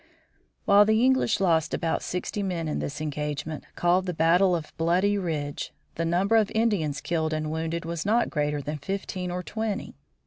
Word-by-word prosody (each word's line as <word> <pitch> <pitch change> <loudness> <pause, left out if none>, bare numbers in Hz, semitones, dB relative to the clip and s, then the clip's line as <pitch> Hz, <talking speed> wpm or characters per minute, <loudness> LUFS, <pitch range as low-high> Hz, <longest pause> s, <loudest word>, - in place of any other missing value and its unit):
While 200 +1 +7
the 220 +3 +3
English 260 -5 +3
lost 165 -4 +2
about 165 -2 -1
sixty 180 +3 -3
men 175 -4 -2
in 150 - -2
this 145 +1 -4
engagement, 150 0 -4
called 180 +2 +2
the 180 - -2
battle 175 +3 +4
of 160 -3 -6
Bloody 180 +5 +2
Ridge, 155 -7 -3 0.2
the 165 - -2
number 190 +7 +3
of 215 -2 +3
Indians 185 -11 +1
killed 160 -2 -1
and 155 0 -2
wounded 165 +1 -3
was 165 -1 -3
not 225 +4 +2
greater 150 -2 -1
than 150 +1 -4
fifteen 185 +2 -4
or 180 +1 -3
twenty. 220 -1 -3
170 Hz, 175 wpm, -26 LUFS, 155-195 Hz, 0.2 s, While